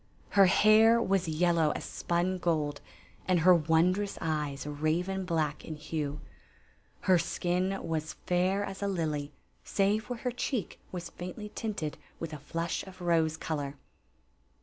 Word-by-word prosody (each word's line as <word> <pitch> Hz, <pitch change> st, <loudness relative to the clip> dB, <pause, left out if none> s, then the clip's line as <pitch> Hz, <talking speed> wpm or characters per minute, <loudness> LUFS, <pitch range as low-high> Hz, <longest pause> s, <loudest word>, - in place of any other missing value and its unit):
Her 195 Hz, -2 st, +6 dB
hair 220 Hz, +4 st, +6 dB
was 195 Hz, -5 st, +1 dB
yellow 165 Hz, 0 st, +2 dB
as -, -, -4 dB
spun 175 Hz, +2 st, -1 dB
gold, 155 Hz, -4 st, 0 dB, 0.5 s
and 180 Hz, -3 st, +3 dB
her 180 Hz, +2 st, +7 dB
won 165 Hz, +2 st, +4 dB
drous 200 Hz, +1 st, -3 dB
eyes 150 Hz, -4 st, -2 dB
raven 165 Hz, +6 st, -1 dB
black 155 Hz, -4 st, -1 dB
in 155 Hz, -, -6 dB
hue. 150 Hz, -1 st, -4 dB, 0.8 s
Her 185 Hz, -2 st, +4 dB
skin 180 Hz, +3 st, -1 dB
was 160 Hz, -1 st, -2 dB
fair 185 Hz, +3 st, +2 dB
as 195 Hz, -1 st, -6 dB
a 200 Hz, -, 0 dB
lily, 155 Hz, -6 st, -2 dB, 0.3 s
save 210 Hz, +3 st, +1 dB
where 245 Hz, -, -3 dB
her 250 Hz, +2 st, -2 dB
cheek 245 Hz, -2 st, -3 dB
was 175 Hz, -2 st, -6 dB
faintly 195 Hz, +4 st, -7 dB
tinted 200 Hz, -9 st, -3 dB, 0.2 s
with 165 Hz, -2 st, -5 dB
a 150 Hz, -, -6 dB
flush 165 Hz, +4 st, -3 dB
of 185 Hz, 0 st, -12 dB
rose 165 Hz, -3 st, +2 dB
color. 145 Hz, -3 st, -3 dB
175 Hz, 150 wpm, -30 LUFS, 155-190 Hz, 0.8 s, her